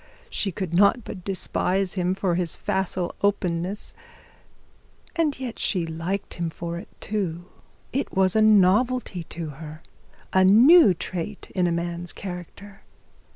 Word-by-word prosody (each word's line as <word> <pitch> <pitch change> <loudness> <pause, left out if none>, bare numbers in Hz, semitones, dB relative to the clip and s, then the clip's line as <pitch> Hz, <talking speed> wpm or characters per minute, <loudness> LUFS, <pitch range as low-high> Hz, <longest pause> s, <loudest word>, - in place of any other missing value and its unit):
She 195 - -1
could 180 -1 -5
not 200 +6 +4
but 185 -3 -8
despise 190 0 0
him 185 0 0
for 190 -2 0
his 170 -2 -1
facile 190 -3 -2
openness, 190 -1 -1 1.2
and 310 -5 0
yet 250 -3 -5
she 180 -5 0
liked 165 +5 -4
him 170 - 0 0.5
too. 175 -5 -3 0.5
It 275 +2 -1
was 190 0 +2
a 220 - +4
novelty 215 +1 +3
to 165 -1 -6
her, 155 +1 -9 0.5
a 190 - +5
new 235 - +7
trait 185 +4 -6
in 180 -2 +2
a - - 0
man's 170 +1 -3
character. 195 +2 -9
190 Hz, 130 wpm, -24 LUFS, 175-205 Hz, 1.2 s, new